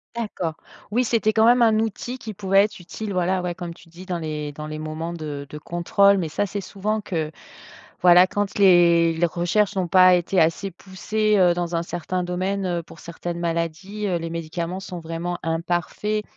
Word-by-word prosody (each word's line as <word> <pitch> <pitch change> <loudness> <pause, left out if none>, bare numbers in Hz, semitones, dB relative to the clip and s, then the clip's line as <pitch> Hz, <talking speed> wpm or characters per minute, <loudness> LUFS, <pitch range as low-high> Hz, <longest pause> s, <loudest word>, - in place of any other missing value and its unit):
D'accord. 185 -8 -3 0.3
Oui 240 +5 +1
c'était 225 -2 +1
quand 220 +1 +4
même 240 +1 +5
un 225 -2 +5
outil 225 +3 -3
qui 225 -4 -7
pouvait 195 0 +3
être 210 -1 -4
utile 200 +4 -6
voilà, 180 0 0
ouais 175 - -2
comme 175 -2 -7
tu 170 - -18
dis 175 +3 -12
dans 180 -2 -2
les 155 -2 -4
dans 150 +1 -7
les 155 0 -6
moments 155 +2 -5
de 150 -4 -6
de 150 - -8
contrôle. 185 +5 +3
Mais 170 -4 -2
ça 205 +6 -1
c'est 200 +1 -4
souvent 205 +3 -2
que 160 -6 -3 0.7
voilà, 180 +1 +7
quand 205 0 -2
les 170 -4 +5
les 170 +2 +2
recherches 175 +5 0
n'ont 185 -2 -1
pas 185 +1 +7
été 180 +1 +1
assez 165 +4 +1
poussées, 210 +4 -1
heu, 180 -2 +5
dans 175 -1 -3
un 165 - +1
certain 175 +1 -3
domaine, 185 +2 -2
heu, 175 -2 -1
pour 165 - -14
certaines 170 0 -6
maladies, 170 +5 -3
heu, 180 - 0
les 165 0 -5
médicaments 170 +2 -4
sont 180 -2 -7
vraiment 165 +2 -4
imparfaits, 175 +6 -1
180 Hz, 200 wpm, -23 LUFS, 170-200 Hz, 0.7 s, voilà